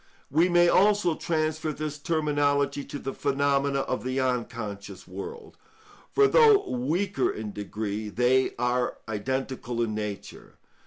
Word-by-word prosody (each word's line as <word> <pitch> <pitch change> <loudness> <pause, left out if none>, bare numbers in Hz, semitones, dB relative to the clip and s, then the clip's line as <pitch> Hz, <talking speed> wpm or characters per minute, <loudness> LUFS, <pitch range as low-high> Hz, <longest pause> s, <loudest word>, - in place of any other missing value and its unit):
We 165 +6 +4
may 175 0 +5
also 200 -1 +4
transfer 155 -1 -1
this 150 0 -5
terminology 145 -2 0
to - - -6
the 135 -1 -5
phenomena 140 0 +1
of 130 - -3
the 130 +1 -1
unconscious 115 -6 -3
world, 440 0 -8 0.5
for 415 0 +5
though 440 -3 +5
weaker 170 +11 0
in 105 -1 -5
degree, 105 +1 -4
they 125 +4 +2
are 125 +1 0
identical 125 +2 -3
in 110 -2 -2
nature. 105 -2 -6
140 Hz, 125 wpm, -27 LUFS, 120-160 Hz, 0.5 s, may